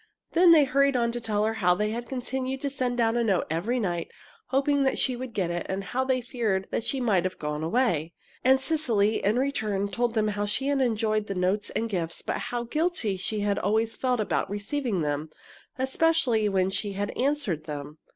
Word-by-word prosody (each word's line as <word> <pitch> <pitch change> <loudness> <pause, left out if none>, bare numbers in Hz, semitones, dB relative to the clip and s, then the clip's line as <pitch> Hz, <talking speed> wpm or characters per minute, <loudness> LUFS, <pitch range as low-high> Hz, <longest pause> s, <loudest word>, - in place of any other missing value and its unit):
Then 345 +1 +6
they 315 -3 +8
hurried 275 0 +2
on 235 -1 +2
to 240 0 -4
tell 210 -2 0
her 220 +1 +1
how 180 -5 +3
they 210 +2 0
had 235 +1 -5
continued 265 +1 -3
to 280 - -2
send 250 -3 -1
down 230 -1 +2
a 240 - +2
note 195 -5 +1
every 210 +10 0
night, 175 -6 -2 0.4
hoping 280 +1 +2
that 265 -1 +2
she 255 - +1
would 255 0 -6
get 190 -6 -1
it, 175 0 -3
and 195 +1 -2
how 255 +6 -1
they 260 -1 +1
had - - -19
feared 215 -7 -1
that - - -1
she 270 - -1
might 210 -8 +2
have 185 0 -3
gone 150 0 -3
away. 170 - +1 0.3
And 265 +1 +5
Cecily, 235 -9 +1
in 210 +4 +2
return, 215 -7 0
told 235 +4 -1
them 215 -1 +2
how 205 0 -2
she 270 +7 0
had 280 -1 +2
enjoyed 215 -3 +1
the 195 - -3
notes 190 +3 0
and 230 - -1
gifts, 170 -6 -2
but - - -2
how 240 -1 -2
guilty 300 - -1
she 205 +3 -3
had 205 -1 +1
always 220 +3 +1
felt 250 -2 0
about 210 -2 0
receiving 205 - -2
them, 150 +1 -2 0.5
especially 265 -5 +2
when 190 -1 +1
she 200 +1 -2
had 205 +1 -2
answered 255 - -1
them. 150 0 -7
225 Hz, 215 wpm, -27 LUFS, 195-260 Hz, 0.5 s, they